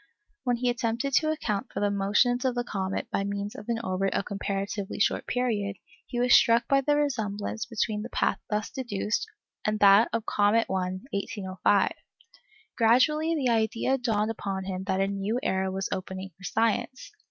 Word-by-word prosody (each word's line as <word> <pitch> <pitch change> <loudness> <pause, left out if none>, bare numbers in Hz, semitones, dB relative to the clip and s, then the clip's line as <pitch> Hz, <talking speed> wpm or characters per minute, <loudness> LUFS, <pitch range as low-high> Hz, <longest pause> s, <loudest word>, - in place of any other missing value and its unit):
When 245 -1 +2
he 245 +1 +1
attempted 235 +3 -2
to 310 - +2
account 250 -7 -2
for - - -4
the 205 0 +1
motions 210 +5 +2
of 255 -2 0
the 245 - 0
comet 195 -4 -3
by 195 - 0
means 200 +1 -3
of 210 - -10
an 235 - +1
orbit 195 -1 -1
of - - 0
comparatively 200 0 -3
short - - +1
period, 210 -5 -1 0.3
he 240 - -3
was 245 0 +4
struck 230 +1 +5
by 275 0 +4
the 290 +2 +2
resemblance 220 -7 -2
between 215 -2 -1
the 235 - -6
path - - 0
thus 210 -1 -2
deduced 225 - -2 0.4
and 215 0 0
that 200 +2 +7
of 230 -1 -2
Comet 210 +3 +3
I, 185 0 -2
1805. 195 0 0 0.8
Gradually 300 +8 +3
the 270 -5 +1
idea 230 +4 +1
dawned 220 -3 0
upon 195 -3 -4
him 190 0 -4
that 190 -1 0
a 195 - +2
new 200 +4 -1
era 190 0 0
was 190 0 -2
opening 190 0 -5
for 195 - -12
science. 230 +4 -1
210 Hz, 175 wpm, -27 LUFS, 195-245 Hz, 0.8 s, that